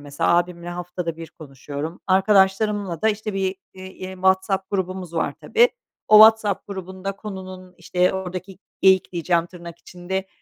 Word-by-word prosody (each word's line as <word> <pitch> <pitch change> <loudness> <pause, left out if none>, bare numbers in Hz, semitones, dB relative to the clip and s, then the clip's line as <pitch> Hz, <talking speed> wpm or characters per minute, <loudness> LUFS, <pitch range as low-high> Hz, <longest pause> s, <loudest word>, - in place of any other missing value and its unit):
mesela. 145 0 -1
Ağabeyimle 175 0 -2
haftada 175 -1 -5
1 165 -1 -9
konuşuyorum. 145 +2 -8
Arkadaşlarımla 195 -1 +2
da 220 - +4
işte 215 -1 -3
bir 190 -1 -1 0.2
i 185 - -13
eee, 190 0 -8
WhatsApp 190 +1 +1
grubumuz 185 -3 -3
var 165 - -1
tabii. 475 +2 +4 0.4
O 215 - +8
WhatsApp 220 -2 +5
grubunda 190 0 -6
konunun, 185 -3 -9
işte, 180 +1 0
oradaki 185 0 -6 0.2
"geyik" 190 -1 +4
diyeceğim 170 0 0
tırnak 170 -2 -11
içinde, 190 +2 -5
185 Hz, 145 wpm, -22 LUFS, 175-195 Hz, 0.4 s, O